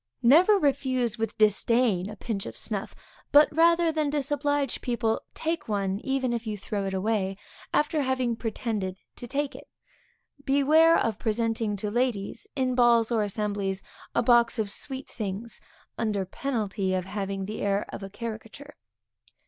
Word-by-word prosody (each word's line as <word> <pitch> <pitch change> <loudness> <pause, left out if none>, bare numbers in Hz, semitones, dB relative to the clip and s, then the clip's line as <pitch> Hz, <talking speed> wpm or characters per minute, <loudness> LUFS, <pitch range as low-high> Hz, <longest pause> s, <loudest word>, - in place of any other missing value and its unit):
_ - - -63 0.2
Never 345 - +6
refuse 255 - 0
with 225 0 -2
disdain 215 -2 +2
a 210 - -7
pinch 215 -3 -4
of - - -8
snuff, - - -4 0.4
and 295 +1 +9
rather 335 +1 +4
than 310 -2 0
disoblige 290 -1 -1
people, 230 -2 0
take 330 +1 -2
one, 200 -2 -1
even 260 0 -1
if 235 -1 -3
you 210 -1 -3
throw 200 0 -3
it 190 - -3
away, 195 -1 0 0.3
after 300 0 +1
having 255 -3 0
pretended 215 -4 -3 0.2
to 245 - -8
take 285 +2 -2
it. 285 - -11 0.8
Beware 305 +5 +5
of 220 -2 -1
presenting 225 -1 0
to 205 +1 -3
ladies, 240 - -1
in 260 -2 +1
balls 240 -2 +4
or 225 -2 +2
assemblies, 205 -2 -2 0.3
a - - +3
box 240 -1 +4
of 210 -2 -1
sweet 265 +2 -5
things, 215 +1 -5 0.4
under 210 -4 0
penalty 205 -4 -2
of 185 -1 -2
having 195 -1 -3
the 215 +2 -5
air 200 0 +1
of - - -7
a 195 - -6
caricature. 230 +7 -8
230 Hz, 155 wpm, -27 LUFS, 205-270 Hz, 0.8 s, and